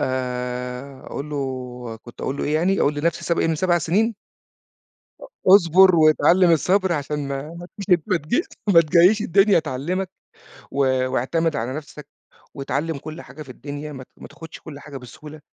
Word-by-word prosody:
آآ، 125 Hz, +1 st, -4 dB
أقول 150 Hz, +2 st, -6 dB
له 145 Hz, -, -3 dB, 0.6 s
كنت 120 Hz, -, -13 dB
أقول 135 Hz, -, -3 dB
له -, -, -3 dB
إيه 150 Hz, -, -1 dB
يعني؟ 185 Hz, +5 st, +1 dB
أقول 145 Hz, -, +2 dB
لنفْسِي 160 Hz, +3 st, -1 dB
السب 170 Hz, -, -1 dB
إيه -, -, +1 dB
من 160 Hz, -, +1 dB
7 175 Hz, +1 st, +1 dB
سنين؟ 210 Hz, +9 st, +1 dB, 1.1 s
أُ -, -, -8 dB, 0.3 s
اصبر 185 Hz, 0 st, +5 dB
واتعلم 170 Hz, +3 st, +5 dB
الصبر؛ 190 Hz, +4 st, +1 dB
علشان 145 Hz, -1 st, -3 dB
ما 135 Hz, 0 st, -3 dB
ما 175 Hz, +1 st, -9 dB
تج 195 Hz, -3 st, +3 dB
ما 185 Hz, -4 st, +2 dB
تجيش 240 Hz, -, -1 dB, 0.2 s
ما 170 Hz, -4 st, +7 dB
تجيش 175 Hz, +7 st, +4 dB
الدنيا 195 Hz, -1 st, +4 dB
تعلمَك، 160 Hz, +6 st, -3 dB, 0.6 s
و 140 Hz, -, -7 dB, 0.3 s
واعتمد 160 Hz, +6 st, 0 dB
على 120 Hz, +3 st, -3 dB
نفْسَك، 150 Hz, -1 st, -9 dB, 0.5 s
واتعلم 140 Hz, +3 st, -3 dB
كل 155 Hz, +4 st, -8 dB
حاجة 140 Hz, +5 st, -12 dB
في 135 Hz, -, -17 dB
الدنيا 145 Hz, +3 st, -7 dB
ما 130 Hz, -2 st, -8 dB
ت -, -, -22 dB
ما -, -, -11 dB
تاخدش 160 Hz, +1 st, -12 dB
كل 145 Hz, -3 st, -10 dB
حاجة 140 Hz, -1 st, -9 dB
بسهولة؛ 150 Hz, +5 st, -12 dB
155 Hz, 175 wpm, -22 LUFS, 140-175 Hz, 1.1 s, ما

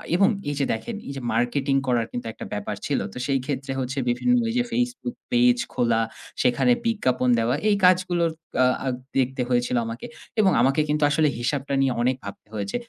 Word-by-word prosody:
এবং 195 Hz, +3 st, +5 dB, 0.2 s
এই 145 Hz, -, -2 dB
যে 140 Hz, -, +2 dB
দেখেন 220 Hz, -, -5 dB
এই -, -, -4 dB
যে 135 Hz, -, -5 dB
মার্কেটিং 135 Hz, +4 st, +1 dB
করার 120 Hz, -2 st, +2 dB
কিন্তু 120 Hz, -, -5 dB
একটা -, -, -8 dB
ব্যাপার -, -, -3 dB
ছিল। -, -, 0 dB
তো -, -, -9 dB
সেই 135 Hz, -1 st, +2 dB
ক্ষেত্রে 135 Hz, -1 st, -3 dB
হচ্ছে 130 Hz, +1 st, -3 dB
বিভিন্ন 245 Hz, -, +2 dB
ওইযে 245 Hz, +2 st, +1 dB
Facebook 245 Hz, 0 st, -2 dB, 0.2 s
পেজ 245 Hz, 0 st, +4 dB, 0.2 s
খোলা, 115 Hz, -3 st, +2 dB, 0.4 s
সেখানে 125 Hz, -, +3 dB
বিজ্ঞাপন 130 Hz, -, +1 dB
দেওয়া 115 Hz, +3 st, +1 dB
এই 205 Hz, -, +4 dB
কাজগুলোর 180 Hz, -2 st, +3 dB, 0.2 s
কা 130 Hz, -, +3 dB, 0.2 s
আ -, -, -1 dB, 0.3 s
দেখতে 130 Hz, 0 st, 0 dB
হয়েছিল 125 Hz, 0 st, +1 dB
আমাকে। 115 Hz, +2 st, -6 dB, 0.3 s
এবং 195 Hz, -3 st, +5 dB
আমাকে 135 Hz, +4 st, +3 dB
কিন্তু 150 Hz, 0 st, +1 dB
আসলে 155 Hz, +1 st, +3 dB
হিসাবটা 140 Hz, +3 st, -2 dB
নিয়ে 135 Hz, -2 st, +2 dB
অনেক 125 Hz, +2 st, +2 dB
ভাবতে 100 Hz, +1 st, -9 dB
হয়েছে। 100 Hz, -2 st, -3 dB
135 Hz, 185 wpm, -24 LUFS, 125-180 Hz, 0.4 s, এবং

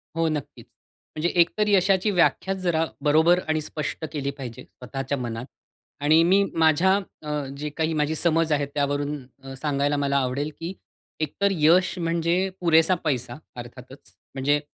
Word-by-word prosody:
हो, 165 Hz, 0 st, +1 dB
नक्कीच. 150 Hz, -3 st, -5 dB, 0.5 s
म्हणजे 155 Hz, +3 st, 0 dB
एकतर 210 Hz, +5 st, +1 dB
यशाची 195 Hz, 0 st, +3 dB
व्याख्याच 190 Hz, +1 st, +1 dB
जरा 165 Hz, -3 st, +1 dB, 0.2 s
बरोबर 160 Hz, +4 st, +4 dB
आणि 155 Hz, 0 st, 0 dB
स्पष्ट 155 Hz, +1 st, -5 dB
केली 140 Hz, -2 st, -2 dB
पाहिजे 125 Hz, -4 st, -8 dB
स्वतःच्या 135 Hz, +3 st, -5 dB
मनात. 120 Hz, -1 st, -5 dB, 0.6 s
आणि 155 Hz, +2 st, +5 dB
मी, 190 Hz, +4 st, +4 dB
माझ्या 165 Hz, +4 st, +4 dB
अ, 150 Hz, -7 st, -5 dB
जे 150 Hz, +1 st, -4 dB
काही 160 Hz, +2 st, -2 dB
माझी 150 Hz, +2 st, 0 dB
समज 165 Hz, 0 st, +1 dB
आहे, 145 Hz, -1 st, +2 dB
त्यावरून 145 Hz, 0 st, -2 dB, 0.2 s
अ, 135 Hz, 0 st, -8 dB
सांगायला 145 Hz, -1 st, 0 dB
मला 140 Hz, -1 st, +1 dB
आवडेल 135 Hz, +3 st, -1 dB
की 170 Hz, +3 st, -5 dB, 0.5 s
एकतर 180 Hz, +6 st, 0 dB
यश 175 Hz, +2 st, +3 dB
म्हणजे 170 Hz, +2 st, 0 dB
पुरेसा 165 Hz, +1 st, +4 dB
पैसा 125 Hz, -5 st, -1 dB, 0.2 s
अर्थातच. 125 Hz, +2 st, -11 dB, 0.2 s
म्हणजे 145 Hz, +2 st, +2 dB
155 Hz, 145 wpm, -24 LUFS, 140-170 Hz, 0.6 s, आणि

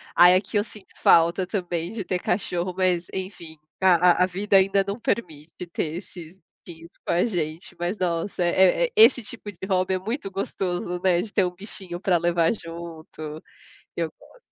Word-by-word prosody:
Aí 180 Hz, +1 st, +8 dB
aqui 195 Hz, +2 st, 0 dB
eu 205 Hz, -, +2 dB
sinto 210 Hz, -3 st, -14 dB
falta 170 Hz, +3 st, +4 dB
também 175 Hz, -3 st, -3 dB
de 220 Hz, -3 st, -4 dB
ter 180 Hz, -1 st, -1 dB
cachorro, 180 Hz, -1 st, -2 dB
mas 180 Hz, -2 st, +1 dB
enfim 180 Hz, -4 st, -6 dB, 0.2 s
a 180 Hz, -1 st, +5 dB
a -, -, +5 dB
vida 195 Hz, +2 st, +2 dB
ainda 195 Hz, +1 st, +3 dB
não 200 Hz, +4 st, -3 dB
permite 155 Hz, -10 st, -3 dB, 0.2 s
ter 160 Hz, -1 st, -2 dB
esses 175 Hz, -1 st, -10 dB, 0.3 s
bichinhos 165 Hz, 0 st, -12 dB
com -, -, -1 dB
a 175 Hz, -, +2 dB
gente, 165 Hz, -5 st, -4 dB
mas 175 Hz, +4 st, -2 dB
nossa 175 Hz, +1 st, -1 dB
é 185 Hz, -, +4 dB
é -, -, -4 dB
esse 240 Hz, +3 st, +7 dB
tipo 205 Hz, -1 st, -7 dB
de 175 Hz, -, -26 dB
hobby 185 Hz, -1 st, +1 dB
é -, -, -2 dB
muito 210 Hz, 0 st, -4 dB
gostos,o 180 Hz, -2 st, -3 dB
né, 180 Hz, -2 st, +3 dB
de 205 Hz, 0 st, -7 dB
ter 195 Hz, -, +3 dB
um 180 Hz, -, -2 dB
bichinho 185 Hz, -2 st, -6 dB
pra 185 Hz, -3 st, +2 dB
levar 170 Hz, +2 st, +2 dB
junto, 165 Hz, -4 st, -9 dB, 0.5 s
eu 165 Hz, -2 st, -1 dB
gosto. -, -, -19 dB
180 Hz, 180 wpm, -24 LUFS, 170-195 Hz, 0.5 s, Aí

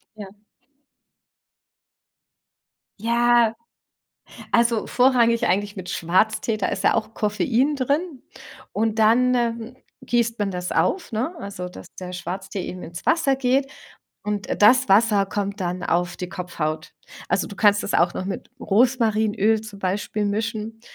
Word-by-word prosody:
Ja. 210 Hz, -2 st, -8 dB, 2.8 s
Ja. 235 Hz, 0 st, +3 dB, 1.0 s
Also 235 Hz, -2 st, +2 dB
vorrangig 240 Hz, -2 st, +3 dB
eigentlich 205 Hz, +3 st, 0 dB
mit 185 Hz, -2 st, -8 dB
Schwarztee, 215 Hz, +6 st, +1 dB
da 200 Hz, -, 0 dB
ist 195 Hz, -, -3 dB
ja -, -, +4 dB
auch 220 Hz, 0 st, -1 dB
Koffein 245 Hz, +6 st, +1 dB
drin. 280 Hz, +2 st, -1 dB, 0.5 s
Und 220 Hz, +1 st, -1 dB
dann, 245 Hz, +4 st, +4 dB
ähm, 235 Hz, 0 st, -2 dB, 0.3 s
gießt 235 Hz, -1 st, 0 dB
man 205 Hz, -2 st, -1 dB
das 180 Hz, 0 st, -4 dB
auf, 375 Hz, -, 0 dB
ne, 250 Hz, +9 st, -2 dB
also 195 Hz, -3 st, -6 dB
dass -, -, -12 dB
der 180 Hz, -1 st, -6 dB
Schwarztee 190 Hz, +2 st, -5 dB
eben 180 Hz, -, -7 dB
ins 170 Hz, +1 st, -9 dB
Wasser 320 Hz, -4 st, +3 dB
geht 265 Hz, +1 st, +1 dB, 0.6 s
und, 210 Hz, -1 st, -3 dB
äh, -, -, -2 dB
das 250 Hz, +4 st, +5 dB
Wasser 205 Hz, 0 st, +4 dB
kommt 200 Hz, +1 st, -3 dB
dann 180 Hz, 0 st, -3 dB
auf 175 Hz, 0 st, 0 dB
die 180 Hz, -, -5 dB
Kopfhaut. 170 Hz, -3 st, -4 dB, 0.4 s
Also, -, -, +1 dB
du 200 Hz, -, -10 dB
kannst 205 Hz, -1 st, +4 dB
das -, -, -3 dB
auch 175 Hz, +1 st, +3 dB
noch 185 Hz, -, -4 dB
mit 195 Hz, -, -5 dB
Rosmarinöl 220 Hz, -2 st, +2 dB
zum 210 Hz, -2 st, -10 dB
Beispiel 205 Hz, +2 st, -2 dB
mischen 220 Hz, +1 st, -3 dB
215 Hz, 140 wpm, -23 LUFS, 195-235 Hz, 2.8 s, das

